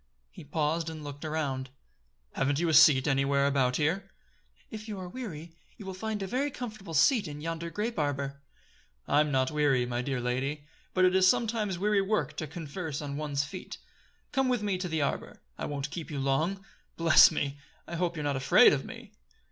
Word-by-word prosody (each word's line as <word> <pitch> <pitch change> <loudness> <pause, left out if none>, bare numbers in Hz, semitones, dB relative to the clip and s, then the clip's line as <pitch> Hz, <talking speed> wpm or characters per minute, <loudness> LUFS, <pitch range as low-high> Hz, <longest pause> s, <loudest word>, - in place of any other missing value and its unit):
He - - -11
paused 155 +2 -1
and 155 -1 -8
looked 145 0 -8
around. 140 -4 -2 0.6
"Haven't 140 +1 0
you 170 - +1
a - - +1
seat 150 -3 +7
anywhere 140 0 +2
about 135 -3 +2
here?" 180 +7 0 0.6
"If 215 0 -7
you 210 -2 -5
are 185 - -6
weary, 175 -7 -7 0.2
you 205 - -10
will 190 - -5
find 210 +1 -4
a - - -2
very 260 +9 -1
comfortable 215 - -7
seat 215 - +4
in 145 -1 -7
yonder 165 +2 -4
grape 210 +6 -3
arbor." 140 -1 -2 0.7
"I'm 150 +1 +3
not 130 -1 +1
weary, 145 -5 +2
my 120 0 -2
dear 130 0 -2
lady; 135 +4 -2 0.3
but 185 0 +5
it 180 - +4
is 190 0 +5
sometimes 220 -4 +1
weary 205 +2 +2
work 190 -7 -1
to 155 - -3
converse 155 0 -5
on 145 -2 -5
one's 145 -1 -1
feet. 180 +5 -8 0.5
Come 270 -2 +1
with 245 -4 0
me 195 -3 -1
to 180 -1 -3
the 160 -2 0
arbor. 140 - -3 0.2
I - - -4
won't 140 0 -4
keep 165 -3 -6
you 145 - -5
long. 155 +9 0 0.3
Bless 165 -1 +7
me! 145 -3 -3 0.3
I 170 - -5
hope 175 0 -1
you're 150 - -3
not 145 -1 0
afraid 130 -1 +6
of - - -1
me." - - -10
155 Hz, 195 wpm, -29 LUFS, 140-190 Hz, 0.7 s, seat